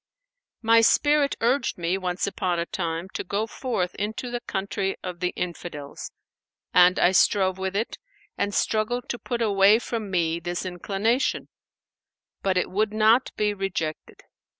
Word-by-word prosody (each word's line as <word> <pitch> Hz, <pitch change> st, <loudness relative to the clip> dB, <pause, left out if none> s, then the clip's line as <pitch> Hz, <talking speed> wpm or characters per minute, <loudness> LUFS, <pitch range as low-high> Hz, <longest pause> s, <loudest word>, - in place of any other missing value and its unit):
"My 230 Hz, +1 st, +6 dB
spirit 290 Hz, +4 st, +3 dB
urged 250 Hz, +5 st, +1 dB
me, 175 Hz, +1 st, 0 dB
once 180 Hz, -1 st, -2 dB
upon 185 Hz, -3 st, -1 dB
a 170 Hz, -, -1 dB
time, 165 Hz, +1 st, -3 dB
to -, -, -3 dB
go 205 Hz, +4 st, -1 dB
forth 220 Hz, -7 st, -3 dB
into 220 Hz, +4 st, -4 dB
the 240 Hz, -, -2 dB
country 195 Hz, -2 st, -2 dB
of 180 Hz, -2 st, -6 dB
the 180 Hz, -, 0 dB
Infidels; 170 Hz, -5 st, -6 dB, 0.6 s
and 180 Hz, 0 st, +6 dB
I 175 Hz, -, +4 dB
strove 190 Hz, 0 st, +3 dB
with 190 Hz, 0 st, -3 dB
it 220 Hz, +3 st, -2 dB, 0.4 s
and 200 Hz, 0 st, -1 dB
struggled 220 Hz, +4 st, 0 dB
to 240 Hz, -, -3 dB
put 240 Hz, -2 st, -2 dB
away 200 Hz, 0 st, +5 dB
from 225 Hz, -3 st, -4 dB
me 170 Hz, -3 st, 0 dB
this 175 Hz, +2 st, -4 dB
inclination; 200 Hz, +7 st, -1 dB, 0.9 s
but 190 Hz, -1 st, +1 dB
it 180 Hz, -, 0 dB
would 210 Hz, +2 st, 0 dB
not 220 Hz, +4 st, +4 dB
be 210 Hz, -1 st, +1 dB
rejected. 185 Hz, -6 st, -4 dB
195 Hz, 150 wpm, -25 LUFS, 180-220 Hz, 0.9 s, My